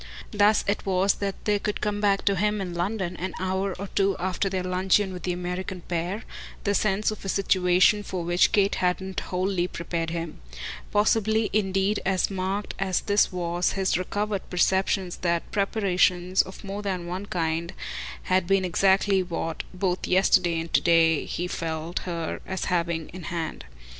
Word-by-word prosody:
Thus 205 Hz, +1 st, +4 dB
it 200 Hz, -, 0 dB
was 190 Hz, 0 st, +2 dB
that 200 Hz, -1 st, -5 dB
there 210 Hz, -1 st, +2 dB
could 210 Hz, 0 st, -2 dB
come 205 Hz, -1 st, -1 dB
back 200 Hz, -1 st, +2 dB
to 200 Hz, -, +3 dB
him 210 Hz, +2 st, +1 dB
in 185 Hz, -3 st, -4 dB
London, 180 Hz, +1 st, -2 dB
an 185 Hz, 0 st, -4 dB
hour 190 Hz, +1 st, -1 dB
or 200 Hz, -, -5 dB
two 195 Hz, -1 st, +2 dB
after 185 Hz, +2 st, -1 dB
their 185 Hz, -1 st, -2 dB
luncheon 185 Hz, +2 st, +2 dB
with 180 Hz, -, -7 dB
the 180 Hz, -, -1 dB
American 180 Hz, +1 st, -4 dB
pair, 175 Hz, +5 st, -3 dB, 0.4 s
the 200 Hz, -, +1 dB
sense 210 Hz, +1 st, +1 dB
of 215 Hz, -, -8 dB
a 195 Hz, -, -4 dB
situation 185 Hz, +1 st, +3 dB
for 185 Hz, -3 st, -4 dB
which 175 Hz, +2 st, +3 dB
Kate 200 Hz, -2 st, +3 dB
hadn't 185 Hz, +1 st, -1 dB
wholly 185 Hz, -1 st, -1 dB
prepared 170 Hz, -1 st, -3 dB
him. 165 Hz, -1 st, -5 dB, 0.5 s
Possibly 220 Hz, +1 st, +2 dB
indeed 195 Hz, 0 st, +1 dB
as 190 Hz, +1 st, +1 dB
marked 195 Hz, +2 st, -2 dB
as 190 Hz, -2 st, +1 dB
this 205 Hz, 0 st, +2 dB
was 175 Hz, -1 st, -1 dB
his 190 Hz, -1 st, +1 dB
recovered 205 Hz, +2 st, -2 dB
perception 190 Hz, +1 st, +1 dB
that 170 Hz, -1 st, 0 dB
preparations, 185 Hz, -3 st, +2 dB
of 190 Hz, -, -9 dB
more 200 Hz, +1 st, -5 dB
than 185 Hz, -4 st, -3 dB
one 185 Hz, +3 st, -5 dB
kind, 165 Hz, -1 st, -1 dB, 0.5 s
had 185 Hz, -1 st, +1 dB
been 195 Hz, -1 st, +3 dB
exactly 195 Hz, +2 st, +3 dB
what, 165 Hz, -2 st, -3 dB
both 185 Hz, -1 st, -1 dB
yesterday 185 Hz, -2 st, +3 dB
and 165 Hz, 0 st, -6 dB
to -, -, +5 dB
day, 165 Hz, -2 st, +4 dB
he 175 Hz, -, -3 dB
felt 165 Hz, 0 st, -3 dB
her 165 Hz, -2 st, -3 dB
as 190 Hz, 0 st, -3 dB
having 170 Hz, -2 st, -1 dB
in 180 Hz, -2 st, -9 dB
hand. 160 Hz, -, -4 dB
185 Hz, 170 wpm, -26 LUFS, 175-200 Hz, 0.5 s, to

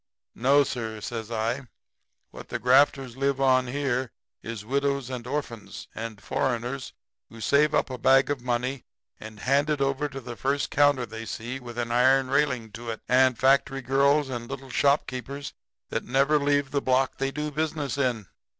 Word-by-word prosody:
No, 140 Hz, +4 st, +4 dB
sir,' 115 Hz, -5 st, -4 dB
says 110 Hz, +1 st, -5 dB
I. 115 Hz, +3 st, -2 dB, 0.6 s
'What -, -, -11 dB
the -, -, -2 dB
grafters 130 Hz, -1 st, +3 dB
live 135 Hz, 0 st, 0 dB
on 130 Hz, -1 st, +3 dB
here 130 Hz, -2 st, -1 dB, 0.3 s
is 110 Hz, -2 st, -6 dB
widows 140 Hz, +1 st, -1 dB
and 125 Hz, -2 st, -5 dB
orphans, 115 Hz, -8 st, -5 dB
and 110 Hz, -2 st, -6 dB
foreigners 125 Hz, +5 st, -2 dB, 0.4 s
who 115 Hz, -, -12 dB
save 140 Hz, +6 st, +3 dB
up -, -, +1 dB
a 125 Hz, -, -5 dB
bag 135 Hz, +3 st, +4 dB
of 140 Hz, -4 st, -2 dB
money 125 Hz, +2 st, -2 dB, 0.4 s
and 110 Hz, -1 st, -10 dB
hand 140 Hz, +3 st, +2 dB
it -, -, +3 dB
out 135 Hz, 0 st, 0 dB
over 150 Hz, -, +1 dB
the 130 Hz, -3 st, -8 dB
first 140 Hz, +3 st, -1 dB
counter 145 Hz, -3 st, +3 dB
they 115 Hz, 0 st, -8 dB
see 120 Hz, +5 st, -5 dB
with 120 Hz, -2 st, -10 dB
an 120 Hz, -1 st, -2 dB
iron 130 Hz, +2 st, +4 dB
railing 130 Hz, -6 st, +1 dB
to 120 Hz, +1 st, -8 dB
it, 110 Hz, -, -5 dB
and 130 Hz, -1 st, +4 dB
factory 135 Hz, 0 st, +2 dB
girls 140 Hz, +3 st, +3 dB
and 120 Hz, -2 st, -5 dB
little 135 Hz, -1 st, -7 dB
shopkeepers 140 Hz, 0 st, 0 dB, 0.4 s
that -, -, -2 dB
never 140 Hz, +4 st, +2 dB
leave 145 Hz, -1 st, +1 dB
the 140 Hz, -, 0 dB
block 130 Hz, +1 st, +1 dB
they 135 Hz, 0 st, 0 dB
do 150 Hz, +2 st, -4 dB
business 150 Hz, -2 st, -2 dB
on. 120 Hz, -6 st, 0 dB
130 Hz, 175 wpm, -26 LUFS, 120-140 Hz, 0.6 s, No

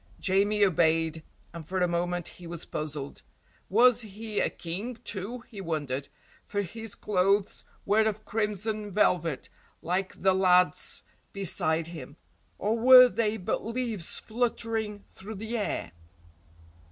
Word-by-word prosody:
Jamie 200 Hz, +2 st, +3 dB
obeyed, 160 Hz, -2 st, +2 dB, 0.3 s
and 165 Hz, -3 st, -8 dB
for 190 Hz, -, -3 dB
a 180 Hz, -, +3 dB
moment 175 Hz, 0 st, -1 dB
he 175 Hz, -, -10 dB
was 170 Hz, -1 st, -6 dB
puzzled. 150 Hz, -2 st, -5 dB, 0.5 s
Was 240 Hz, +3 st, +5 dB
he 215 Hz, 0 st, -4 dB
a -, -, +2 dB
King, 195 Hz, +9 st, -5 dB
too, 220 Hz, +5 st, -2 dB
he 220 Hz, -4 st, -10 dB
wondered, 145 Hz, -6 st, -3 dB, 0.4 s
for 205 Hz, -1 st, -2 dB
his 225 Hz, +3 st, -6 dB
clothes 195 Hz, 0 st, +1 dB, 0.2 s
were 215 Hz, +2 st, +3 dB
of 215 Hz, 0 st, -3 dB
crimson 210 Hz, 0 st, -2 dB
velvet 170 Hz, -7 st, +1 dB, 0.4 s
like 185 Hz, +3 st, -1 dB
the 190 Hz, 0 st, +3 dB
lad's 180 Hz, -1 st, +2 dB, 0.3 s
beside 165 Hz, -4 st, 0 dB
him, 155 Hz, -3 st, -9 dB, 0.4 s
or 215 Hz, +3 st, 0 dB
were 255 Hz, +1 st, +9 dB
they 220 Hz, -2 st, 0 dB
but 180 Hz, -, -2 dB
leaves 230 Hz, -6 st, -3 dB
fluttering 225 Hz, -3 st, -2 dB
through 215 Hz, +3 st, -8 dB
the 220 Hz, +4 st, -4 dB
air? 215 Hz, -, -2 dB
195 Hz, 130 wpm, -28 LUFS, 170-220 Hz, 0.5 s, were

